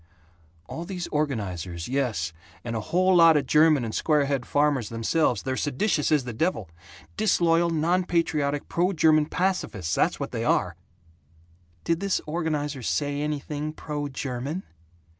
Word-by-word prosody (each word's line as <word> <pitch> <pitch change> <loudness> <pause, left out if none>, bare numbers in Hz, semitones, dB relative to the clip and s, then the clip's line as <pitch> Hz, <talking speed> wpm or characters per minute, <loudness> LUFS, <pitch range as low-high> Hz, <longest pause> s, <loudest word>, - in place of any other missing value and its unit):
"All 165 - -6
these 180 -1 -5
organizers, 95 - -3
yes, 115 -11 -1 0.3
and 115 -1 -4
a - - -1
whole 185 - +2
lot 165 -2 +7
of 145 - +1
the - - -15
German 150 -3 +4
and 110 - -5
Squarehead 140 -4 +1
farmers 145 -6 +1
themselves, 115 0 0
they're 130 0 -2
seditious 150 +4 0
as 150 -3 +3
the 120 -1 -6
devil 110 - -1 0.5
disloyal, 170 -5 +3
non 170 +3 +1
patriotic, 150 -5 0
pro 180 +3 +1
German 155 -2 +4
pacifists, 170 - -1
that's - - +1
what - - -4
they - - -3
are!" - - +1 1.1
"Did 165 0 0
this 195 0 0
organizer 150 -3 -2
say 145 +4 -1
anything 150 0 -3
pro 150 -2 -4
German?" 135 +5 -4
150 Hz, 145 wpm, -25 LUFS, 130-165 Hz, 1.1 s, lot